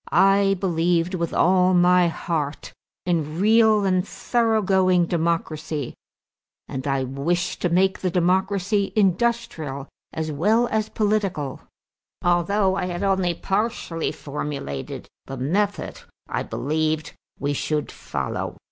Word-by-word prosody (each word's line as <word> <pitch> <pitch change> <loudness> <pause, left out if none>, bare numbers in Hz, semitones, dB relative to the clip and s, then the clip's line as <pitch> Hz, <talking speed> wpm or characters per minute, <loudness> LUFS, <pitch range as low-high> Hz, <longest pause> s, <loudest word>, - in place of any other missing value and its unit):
I 195 0 +4
believed 175 -1 +1
with 170 -3 -2
all 185 +1 +3
my 180 0 +5
heart 160 -3 -3 0.3
in 165 -2 -1
real 215 0 +4
and 185 -1 +2
thorough 225 -3 +1
going 185 -2 +3
democracy 160 -4 -2 0.7
and 130 +1 -5
I 135 -1 +1
wished 155 +8 -2
to 180 - +1
make 190 +2 +2
the 185 - 0
democracy 190 +3 +1
industrial 190 - 0 0.2
as 160 -1 -3
well 210 +11 +2
as 220 0 0
political, 200 -10 -1 0.6
although 190 +3 +2
I 185 - -1
had 175 0 -3
only 190 -3 +1
partially 195 -4 -2
formulated 140 - -5 0.2
the 135 - -6
method 200 +11 -1 0.3
I - - -2
believed 155 +1 -2 0.2
we 145 0 -1
should 150 +1 -2
follow." - - -4
180 Hz, 120 wpm, -23 LUFS, 155-195 Hz, 0.7 s, my